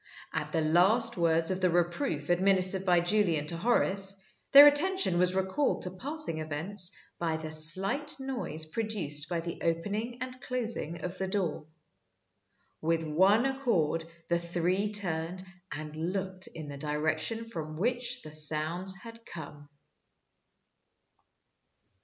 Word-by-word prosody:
At -, -, -3 dB
the 165 Hz, -, 0 dB
last 195 Hz, +9 st, +3 dB
words 165 Hz, -1 st, +2 dB
of 185 Hz, 0 st, -2 dB
the 185 Hz, -, +3 dB
reproof 175 Hz, -, -1 dB
administered 190 Hz, +1 st, +2 dB
by 175 Hz, -1 st, +4 dB
Julian 175 Hz, -5 st, +1 dB
to 170 Hz, -, -2 dB
Horace, 195 Hz, -2 st, +1 dB, 0.3 s
their 285 Hz, +1 st, +11 dB
attention 290 Hz, -, +4 dB
was 180 Hz, +1 st, +2 dB
recalled 190 Hz, +10 st, 0 dB
to 180 Hz, -, -2 dB
passing 270 Hz, -, -2 dB
events 175 Hz, +5 st, 0 dB, 0.2 s
by 165 Hz, -2 st, -1 dB
the 160 Hz, 0 st, -7 dB
slight 195 Hz, -, +2 dB
noise 245 Hz, -, -2 dB
produced 160 Hz, -6 st, -2 dB
by 170 Hz, -2 st, -1 dB
the 170 Hz, 0 st, -7 dB
opening 205 Hz, +8 st, -2 dB
and 255 Hz, 0 st, -7 dB
closing 230 Hz, -10 st, -3 dB
of 180 Hz, +1 st, -5 dB
the 190 Hz, -, -1 dB
door. 180 Hz, -6 st, -2 dB, 1.1 s
With 165 Hz, +1 st, 0 dB
one 190 Hz, -, +3 dB
accord 225 Hz, -, 0 dB, 0.2 s
the 170 Hz, 0 st, +1 dB
three 175 Hz, +4 st, -1 dB
turned 180 Hz, -3 st, -2 dB, 0.3 s
and 155 Hz, 0 st, -6 dB
looked 185 Hz, +3 st, -3 dB
in 155 Hz, -2 st, -9 dB
the 140 Hz, -1 st, -7 dB
direction 155 Hz, +9 st, -2 dB
from 155 Hz, -8 st, -6 dB
which 245 Hz, +5 st, -2 dB
the 155 Hz, -, -10 dB
sounds 155 Hz, +5 st, +2 dB
had 230 Hz, 0 st, -11 dB
come. 145 Hz, -6 st, -10 dB
180 Hz, 135 wpm, -29 LUFS, 160-215 Hz, 1.1 s, their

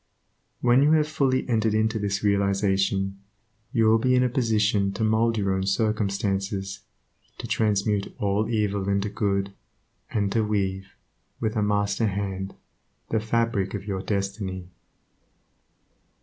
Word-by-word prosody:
When 125 Hz, +2 st, +4 dB
you 150 Hz, +2 st, +5 dB
have 155 Hz, -1 st, +3 dB
fully 135 Hz, -4 st, 0 dB
entered 110 Hz, -3 st, +1 dB
into 110 Hz, +1 st, +1 dB
this 100 Hz, 0 st, -2 dB
realization, 100 Hz, -1 st, +1 dB, 0.5 s
you 115 Hz, -4 st, +2 dB
will 110 Hz, +1 st, +5 dB
be 125 Hz, +2 st, +3 dB
in 125 Hz, -, +4 dB
a 125 Hz, -, +2 dB
position 110 Hz, -5 st, +1 dB
to 110 Hz, -, -2 dB
mould 110 Hz, +1 st, +2 dB
your 100 Hz, -2 st, +1 dB
own 95 Hz, 0 st, -1 dB
circumstances, 100 Hz, -2 st, -1 dB, 0.6 s
to -, -, -6 dB
transmute 105 Hz, -1 st, 0 dB
all 105 Hz, +2 st, 0 dB
evil 100 Hz, -3 st, 0 dB
into 100 Hz, +1 st, 0 dB
good 100 Hz, -1 st, -1 dB, 0.6 s
and 100 Hz, -2 st, 0 dB
to 110 Hz, 0 st, +2 dB
weave, 95 Hz, -2 st, -2 dB, 0.4 s
with 110 Hz, 0 st, -1 dB
a 110 Hz, -, +1 dB
master 105 Hz, +1 st, +1 dB
hand, 95 Hz, -1 st, -3 dB, 0.6 s
the 110 Hz, -, +2 dB
fabric 110 Hz, -3 st, 0 dB
of 100 Hz, -1 st, -6 dB
your 95 Hz, -2 st, -3 dB
destiny. 95 Hz, -2 st, -3 dB
105 Hz, 135 wpm, -25 LUFS, 100-110 Hz, 0.6 s, you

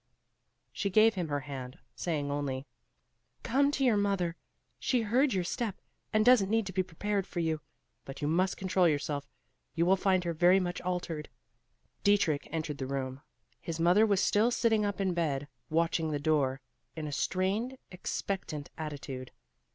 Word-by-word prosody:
She 200 Hz, -, -1 dB
gave 215 Hz, +3 st, +5 dB
him 180 Hz, -5 st, -2 dB
her 145 Hz, -1 st, -1 dB
hand, 135 Hz, -3 st, -7 dB, 0.2 s
saying 150 Hz, -5 st, -2 dB
only, 140 Hz, -2 st, -2 dB, 0.8 s
"Come 275 Hz, +4 st, +3 dB
to 270 Hz, -, +1 dB
your 230 Hz, -4 st, +4 dB
mother; 195 Hz, -4 st, 0 dB, 0.4 s
she 250 Hz, -3 st, +1 dB
heard 255 Hz, +6 st, +3 dB
your 185 Hz, -4 st, +1 dB
step, 215 Hz, +3 st, -3 dB, 0.3 s
and 215 Hz, -1 st, +3 dB
doesn't 245 Hz, -6 st, +6 dB
need 225 Hz, 0 st, +2 dB
to 190 Hz, -, -6 dB
be 185 Hz, -, +2 dB
prepared 195 Hz, +3 st, -2 dB
for 175 Hz, -, -4 dB
you. 160 Hz, -2 st, 0 dB, 0.4 s
But 135 Hz, -, -9 dB
you 145 Hz, -, -1 dB
must 180 Hz, +4 st, +1 dB
control 185 Hz, -1 st, +2 dB
yourself; 145 Hz, -2 st, -1 dB, 0.5 s
you 170 Hz, 0 st, +2 dB
will 190 Hz, +2 st, +5 dB
find 190 Hz, -1 st, +2 dB
her 170 Hz, -1 st, -1 dB
very 175 Hz, +4 st, +5 dB
much 175 Hz, -1 st, -3 dB
altered." 175 Hz, -4 st, -3 dB, 0.7 s
Dietrich 200 Hz, -8 st, +3 dB
entered 155 Hz, -3 st, -3 dB
the 130 Hz, -, -3 dB
room. 135 Hz, 0 st, -3 dB, 0.4 s
His 165 Hz, +5 st, -5 dB
mother 180 Hz, +6 st, +5 dB
was 200 Hz, -2 st, +2 dB
still 215 Hz, +3 st, +3 dB
sitting 225 Hz, -3 st, +2 dB
up 205 Hz, -1 st, -2 dB
in 190 Hz, -2 st, +1 dB
bed, 145 Hz, -5 st, -1 dB, 0.2 s
watching 165 Hz, 0 st, +1 dB
the 150 Hz, -, 0 dB
door, 140 Hz, -3 st, +1 dB, 0.3 s
in 160 Hz, -1 st, -4 dB
a 150 Hz, -, -4 dB
strained, 195 Hz, -, -1 dB
expectant 180 Hz, -4 st, -4 dB
attitude. 140 Hz, -4 st, -5 dB
175 Hz, 165 wpm, -31 LUFS, 150-200 Hz, 0.8 s, doesn't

